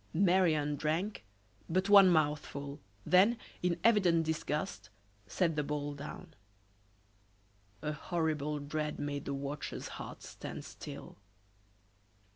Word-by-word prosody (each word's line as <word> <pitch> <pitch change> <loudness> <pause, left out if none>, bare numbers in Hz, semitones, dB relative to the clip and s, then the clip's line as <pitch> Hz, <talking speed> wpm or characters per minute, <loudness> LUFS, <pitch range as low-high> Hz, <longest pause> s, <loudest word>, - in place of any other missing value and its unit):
Marie 180 -2 +4
Anne 150 -1 0
drank 165 - -1 0.5
but 185 +3 +1
one 200 -2 +9
mouthful, 145 -3 0 0.3
then, 200 +6 +5 0.2
in 175 -1 0
evident 185 -8 +4
disgust, 155 - -2 0.4
set 165 - +1
the 150 - +1
bowl 145 0 -3
down. 150 +4 -8 1.5
A 150 - -1
horrible 150 -1 -1
dread 150 +1 -3
made 145 -1 -3
the 140 - -2
watcher's 140 +2 -5
heart - - -8
stand - - -7
still. - - -9
155 Hz, 110 wpm, -33 LUFS, 145-180 Hz, 1.5 s, one